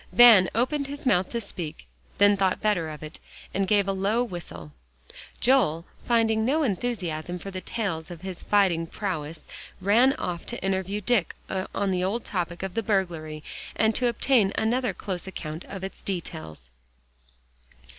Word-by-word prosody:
Van 230 -6 +8
opened 275 +4 +1
his 285 0 -7
mouth 190 -7 +3
to 235 - -2
speak, 175 - -5 0.3
then 205 0 +6
thought 190 -2 +1
better 200 -7 +1
of 155 0 -8
it, 155 +1 -7 0.3
and 195 0 0
gave 200 -1 +3
a - - +2
low 200 +5 +1
whistle. 155 - -7 0.7
Joel, 235 - +3 0.2
finding 225 -2 +3
no 295 +7 +2
enthusiasm 180 - -2
for 195 +3 -7
tales 185 -3 -3
of 175 0 -9
his 190 -2 -4
fighting 185 -5 +2
prowess, 165 -6 -4 0.3
ran 225 +8 +5
off 175 -8 -4
to 240 - -5
interview 195 +1 -1
Dick 210 -3 +1 0.4
on 200 -1 +1
the 180 -1 0
old 210 +6 -1
topic 175 -2 -3
of 195 -2 -4
the 225 - 0
burglary 170 -7 -1 0.3
and 220 0 +3
to 250 - +2
obtain 235 -3 +3
another 245 +3 +1
close 190 -2 -5
account 160 -3 -6
of 195 -1 -7
its 190 - -6
details. 155 - -6
195 Hz, 155 wpm, -26 LUFS, 170-225 Hz, 0.7 s, Van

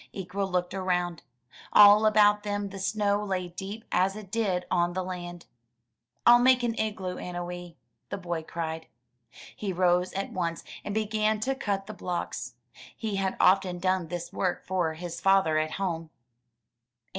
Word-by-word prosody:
Ikwa 195 +1 -3
looked 180 0 -1
around. 180 -3 -1 0.5
All 210 +1 +8
about 210 -1 +5
them 205 -1 -3
the 195 0 -8
snow 205 +1 0
lay 185 -3 -2
deep 195 +5 -7
as 190 +2 +2
it 210 -3 -10
did 195 -6 0
on 175 -1 +2
the 185 +1 -2
land. 175 -1 -7 0.8
"I'll 240 0 +8
make 255 0 +5
an 235 -1 +1
igloo, 195 -4 -2
Annowee," 175 -1 -6 0.3
the 200 - -3
boy 175 -3 -3
cried. 160 0 -5 0.7
He 200 -2 -3
rose 180 0 +2
at 195 +1 -3
once, 170 -3 -2 0.2
and 205 - -4
began 215 0 +1
to 270 +4 0
cut 200 -7 -2
the 215 - -7
blocks. 150 - -4 0.4
He 215 -3 -3
had 190 -1 -1
often 185 -1 +4
done 185 -1 0
this 175 +1 -6
work 180 -2 -1
for 175 -4 0
his 170 0 -6
father 190 -5 +4
at 155 0 -2
home. 165 -4 -3
185 Hz, 155 wpm, -28 LUFS, 175-205 Hz, 0.8 s, All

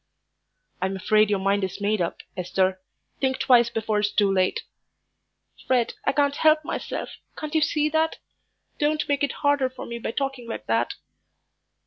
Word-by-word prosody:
"I'm 190 +1 -1
afraid 215 +2 +3
your 205 - +2
mind 195 +1 +1
is 190 - -3
made 205 0 0
up, 170 - -3
Esther. 185 +1 0 0.4
Think 265 -1 +1
twice 240 -2 +5
before 220 -2 -1
it's 205 0 +1
too 205 -2 +2
late." 185 -1 +1 1.0
"Fred, 250 -3 +2
I - - +3
can't 285 0 +1
help 310 -1 +4
myself - - -4 0.2
can't 305 0 -5
you 315 - +3
see 300 0 +2
that? 320 +1 +1 0.6
Don't 300 +1 +1
make 285 -1 0
it 285 - +1
harder 285 -2 +3
for 255 - -9
me 235 0 -6
by - - -4
talking 270 -1 -3
like 225 - -6
that." 115 +1 0
235 Hz, 165 wpm, -25 LUFS, 195-285 Hz, 1.0 s, twice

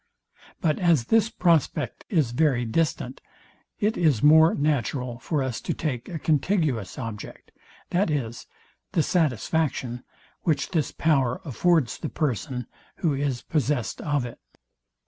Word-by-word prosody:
But 155 -4 +1
as 170 -8 +3
this 225 -1 +5
prospect 155 - +1
is 155 - +2
very 125 -2 +2
distant, 130 0 -1 0.6
it 210 +2 +1
is 150 -10 +2
more 160 +2 +7
natural 130 -4 -1
for 145 0 -1
us 130 -3 -3
to - - -2
take 130 -7 -3
a 170 - -4
contiguous 150 - 0
object, 115 -4 -7 0.4
viz, 145 - -1 0.5
the 160 - +3
satisfaction, 140 - 0 0.4
which 160 -4 0
this 160 -6 0
power 135 -6 +1
affords 155 -1 +1
the - - -4
person, 130 -3 -2 0.3
who 160 -4 0
is 135 -3 -2
possest 145 -5 -1
of 145 -4 0
it. 120 - -8
145 Hz, 125 wpm, -25 LUFS, 125-160 Hz, 0.6 s, more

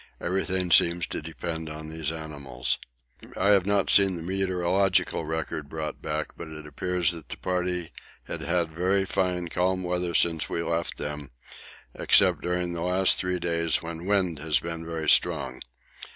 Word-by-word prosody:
Everything 95 0 -1
seems 85 +2 +5
to - - -5
depend 80 +1 -5
on 75 0 -7
these 80 -1 -3
animals. 70 -6 -3 0.6
I 100 - +2
have 100 -2 +4
not 100 -1 +2
seen 95 -2 +6
the 85 - -6
meteorological 95 -1 +1
record 75 -2 -4
brought 75 -1 -5
back, 75 +1 -2
but 85 - -8
it 75 -1 -8
appears 90 +4 0
that 85 -3 -8
the - - -5
party 90 -2 -2 0.3
had - - -5
had 85 -2 +1
very 95 +4 +1
fine 90 -3 -1
calm 95 +2 0
weather 90 -1 -1
since 80 -2 +2
we 85 - -1
left 85 0 -1
them, 75 -1 -5 0.6
except - - +4
during 90 0 -1
the 85 - -4
last 90 +2 +3
three 90 0 0
days 85 -2 +1
when 85 +2 -6
wind 95 -6 +1
has 75 0 +2
been 85 -1 -5
very 80 -2 -3
strong. 65 -3 +2
85 Hz, 165 wpm, -27 LUFS, 80-90 Hz, 0.6 s, seen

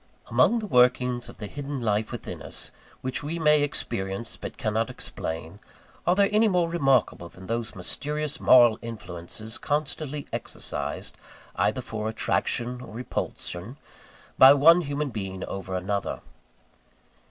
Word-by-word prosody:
Among 235 - +4
the 220 - -3
workings 125 -4 +3
of - - -12
the 105 - -6
hidden 140 +5 -5
life 110 -2 0
within - - -6
us - - -6 0.3
which 130 +2 -3
we 150 +3 -3
may 150 -2 +4
experience 115 -7 -2
but - - -8
cannot 110 -2 0
explain, 80 +4 -6 0.5
are 175 - +5
there 200 0 +4
any 215 +2 +4
more 180 -4 +2
remarkable 135 - +1
than 95 +2 -13
those 115 +2 -3
mysterious 150 +10 -2
moral 120 -3 +6
influences 110 -1 -5
constantly 150 0 -1
exercised, - - -4 0.4
either - - +1
for 110 0 -3
attraction 120 +2 -1
or 115 -4 -10
repulsion, 115 -2 -4 0.6
by 135 +2 +10
one 165 +5 +7
human 145 -2 -2
being 95 -4 -5
over 95 -1 -5
another? 100 +2 -2
125 Hz, 135 wpm, -26 LUFS, 105-145 Hz, 0.6 s, by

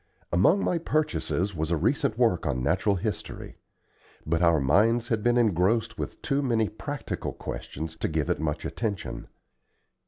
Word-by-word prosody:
Among 100 - +4
my 175 - +1
purchases 100 - -1
was 80 0 -2
a 85 - +1
recent 125 - +1
work 115 -9 +2
on 65 -3 -1
natural 95 +8 +2
history. 90 - -5 0.7
But 80 +2 0
our 85 -2 +4
minds 110 - +3
had 115 -3 +1
been 120 +2 +3
engrossed 110 +1 +2
with - - -5
too 140 +1 +1
many 115 -5 +1
practical 145 +6 -5
questions 80 +2 -6
to - - -1
give 75 -2 -1
it - - 0
much 75 -1 -2
attention. 105 -6 -4
100 Hz, 155 wpm, -27 LUFS, 80-120 Hz, 0.7 s, Among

